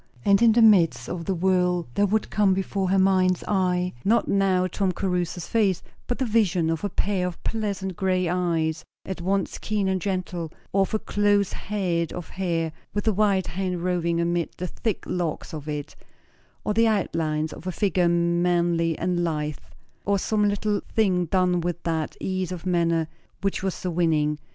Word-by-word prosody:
And 200 +1 +5
in 230 -2 +6
the 235 0 +5
midst 165 - +5
of 170 -2 -5
the 190 - 0
whirl 180 -1 +1
there 205 +7 +2
would 215 +2 0
come 200 -3 +3
before 195 0 -1
her 195 - +3
mind's 185 -1 +3
eye, 180 -2 +1
not 230 +3 +2
now 190 -2 +2
Tom 185 +1 0
Caruthers' 180 -2 -2
face, 200 -6 +1 0.2
but 245 - -1
the 265 - 0
vision 190 -8 +2
of 165 - -3
a 205 - 0
pair 190 -1 0
of 175 - -8
pleasant 200 -4 -2
grey 185 -2 +1
eyes 170 -2 0 0.2
at 190 -2 -5
once 195 +1 -1
keen 210 -2 -1
and 190 -1 0
gentle; 180 -4 -3 0.2
or 195 - +3
of 195 - 0
a - - +4
close 205 -2 +1
head 180 -5 -2
of 175 - -7
hair 170 -4 -1 0.2
with 205 +1 -1
a 220 - +4
white 195 -2 +2
hand 180 0 -3
roving 170 -2 0
amid 170 0 0
the 180 - -3
thick 205 +4 -3
locks 170 -4 -3
of 155 -1 -6
it; 150 -1 -5 0.7
or 210 - 0
the 225 +2 +4
outlines 160 -7 0
of 180 - -10
a - - 0
figure 180 -2 +1
manly 170 -1 +1
and 175 0 0
lithe; 150 -3 -2 0.5
or 200 0 +2
some 210 +1 +1
little 205 0 0
thing 185 -5 +3
done 180 0 +2
with 175 0 -3
that 160 -2 -2
ease 185 -1 -2
of 180 -1 -6
manner 170 -3 +1 0.3
which 195 0 -1
was 190 -1 -1
so 180 - -4
winning. 155 -3 +1
180 Hz, 185 wpm, -25 LUFS, 170-195 Hz, 0.7 s, in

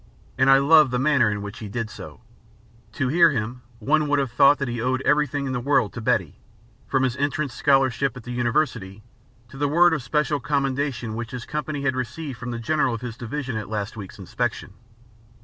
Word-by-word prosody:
And 130 +1 +3
I 135 - +8
loved 150 +1 +6
the 125 - -1
manner 135 -3 +3
in 105 -1 -3
which 100 +2 -8
he 110 - -6
did 115 +1 -4
so. - - -11 0.7
To 130 -2 -1
hear 170 +3 +5
him, 120 -2 -3 0.2
one 150 +7 +1
would 145 0 +2
have 135 -4 -1
thought 140 +3 +5
that 140 - -3
he 120 -1 -3
owed 130 +2 -1
everything 145 -1 +1
in 130 - -3
the 125 - -1
world 130 -4 +1
to 120 - -6
Betty - - 0 0.5
from 135 -1 +1
his 130 -2 0
entrance 145 -1 -1
scholarship 135 -1 +1
at 125 - -10
the 125 - -7
University 120 -5 -1 0.5
to 135 - -12
the 145 - +1
word 170 +4 +4
of 150 - -1
special 150 +3 0
commendation 135 -4 -2
which 115 +1 -5
his 125 -1 -7
company 150 -1 -4
had 135 -2 +1
received 130 +2 -5
from 125 +1 -6
the 120 - -4
General 130 0 0
of 115 - -8
his 120 -3 -6
Division 130 +1 -5
at 105 -2 -6
last 105 0 -4
week's 100 -4 -9
inspection. 110 +2 -4
130 Hz, 210 wpm, -23 LUFS, 120-145 Hz, 0.7 s, I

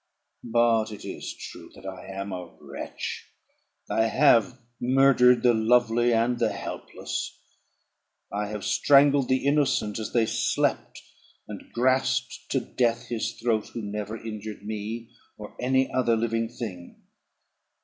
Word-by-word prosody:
"But 115 -2 +2
it 105 - -9
is - - -6
true - - -10
that 95 - -14
I 95 -1 -7
am 100 +1 -5
a 90 -2 -6
wretch. - - -6 0.6
I 110 - +2
have 130 0 +4 0.2
murdered 125 -1 +5
the 120 -1 +5
lovely 120 +1 +3
and 120 +1 +2
the - - +2
helpless; - - -5 1.0
I 105 +1 -1
have 105 -1 -5
strangled 140 -1 +4
the 130 +1 +1
innocent 140 -7 +1
as 110 - -4
they 115 -2 +3
slept, - - -1 0.4
and - - -9
grasped 130 +2 0
to - - +1
death 120 -2 -1
his 115 -2 -2
throat 115 -3 0
who 115 - -4
never 105 +1 -4
injured 110 -2 -7
me 110 +2 -5 0.3
or 105 -1 -10
any 130 +1 +2
other 120 -3 +2
living 115 0 -1
thing. 105 -8 -8
115 Hz, 135 wpm, -26 LUFS, 105-125 Hz, 1.0 s, murdered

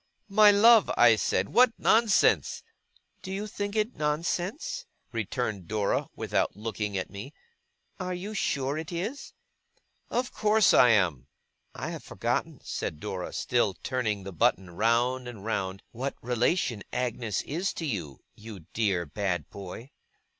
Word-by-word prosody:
'My 210 +1 +7
love!' 220 +1 +6 0.3
said 95 -2 +1
I, - - -14
'what 250 -1 +5
nonsense!' 225 -2 +3 0.6
'Do 190 - -7
you 200 +2 -3
think 205 -1 -4
it 215 0 +2
is - - -28
nonsense?' 180 - -2 0.2
returned 110 -4 -3
Dora, 105 -2 0
without - - -1
looking 105 -1 -3
at 95 - -4
me. 105 +9 -8 0.6
'Are 180 -1 -3
you 195 +4 -6
sure 140 -6 -1
it 160 +1 -7
is?' 205 +11 -5 0.7
'Of 250 +1 -1
course 215 -1 +4
I 125 - +7
am!' 85 - +2 0.5
'I - - -4
have - - -7
forgotten,' - - -2
said 75 - -4
Dora, 95 -2 -5
still 120 -6 0
turning 110 -6 -1
the 95 0 -7
button 90 +2 +1
round 120 +6 +1
and 110 -5 -9
round, 95 -4 -2
'what 130 +4 -4
relation 120 - 0
Agnes 115 -5 -2
is 175 +7 -2
to 165 - -4
you, 90 - -4
you 105 -3 -10
dear 100 -6 +1
bad 90 +3 -3
boy. 100 +6 -9
120 Hz, 145 wpm, -28 LUFS, -, 0.7 s, My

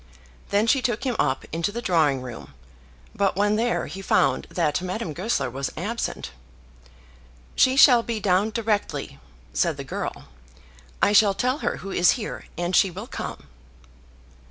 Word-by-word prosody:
Then 205 +2 +2
she 270 +3 +3
took 240 -3 -1
him 255 -3 -1
up 130 - 0
into 165 +4 -1
the 235 - -4
drawing 155 - +1
room; 125 -2 -9 0.6
but, 200 -1 +1
when 205 +2 +2
there, 235 +2 0
he 195 - -7
found - - +1
that 165 -2 0
Madame 185 -2 -4
Goesler 180 - -1
was 135 +2 -3
absent. 215 - -4 1.2
"She 260 0 +4
shall 250 -3 +7
be 230 -1 -3
down 195 +1 +2
directly," 220 -2 -2 0.3
said - - +1
the - - -5
girl. - - -5 0.8
"I 205 - +4
shall 205 -2 +5
tell 255 +6 0
her - - -2
who 195 - -7
is 175 - +4
here, 215 - -6
and 175 +1 -1
she 195 - +5
will 190 +5 -7
come." - - -6
205 Hz, 155 wpm, -24 LUFS, 175-230 Hz, 1.2 s, shall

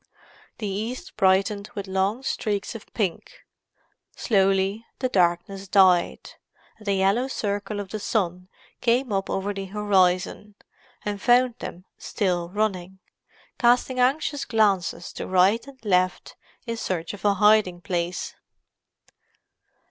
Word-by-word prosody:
The 215 - -5
east 230 - -4
brightened 200 +2 +2
with 200 - -4
long 195 +6 -1
streaks 210 -5 -2
of 225 - -11
pink; 210 - -3 0.7
slowly 195 0 +1
the 255 - -1
darkness 185 0 0
died, 185 -3 +3 0.5
and 210 - -15
the 200 - +2
yellow 195 +7 +2
circle 205 -4 -3
of 200 -2 -6
the 215 - -4
sun 180 -4 -2 0.3
came 245 -1 +1
up 195 0 -1
over 200 +1 -2
the 195 -1 -5
horizon, 195 0 +1 0.5
and 205 -1 -3
found 245 0 +4
them 180 +2 -8
still 175 -4 -1
running—casting 215 +6 -2
anxious 275 +2 +1
glances 200 -7 0
to - - -6
right 190 +7 +3
and 275 -1 -12
left 185 -2 +1 0.3
in 230 -1 -3
search 175 -5 -3
of 205 - -10
a 205 -1 +3
hiding 210 -3 +4
place. 175 0 -3
200 Hz, 125 wpm, -24 LUFS, 185-220 Hz, 0.7 s, found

